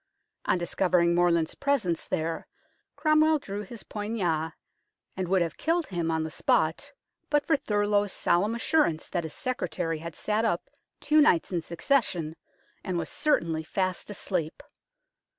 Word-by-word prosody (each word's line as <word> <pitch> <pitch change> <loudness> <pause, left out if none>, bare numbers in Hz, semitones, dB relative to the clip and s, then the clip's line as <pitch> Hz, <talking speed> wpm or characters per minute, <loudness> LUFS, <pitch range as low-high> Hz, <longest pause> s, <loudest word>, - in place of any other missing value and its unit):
On - - +2
discovering 175 0 +2
Morland's 170 -2 +2
presence 245 - 0
there 165 +1 -2 0.5
Cromwell 310 0 +4
drew 205 -7 -5
his 215 +2 -9
poignard, 180 -7 -2 0.6
and 185 -1 -2
would 185 0 +3
have 165 - -5
killed 335 +1 +1
him 170 -3 -2
on 160 -1 0
the 160 - -5
spot 165 - +1 0.4
but 295 -1 +2
for 320 - +3
Thurloe's 205 -5 +1
solemn 205 +7 +1
assurance 235 - +1
that 175 -3 -2
his 155 - -6
secretary 175 -10 -2
had 170 0 -7
sat 215 +1 0
up 225 - -1 0.3
two 305 0 +4
nights 180 - +3
in 175 -2 0
succession, 170 - 0 0.5
and 185 -2 -2
was 165 -2 -3
certainly 165 - +1
fast 185 +3 -2
asleep. 180 -5 -3
185 Hz, 145 wpm, -28 LUFS, 165-230 Hz, 0.6 s, Cromwell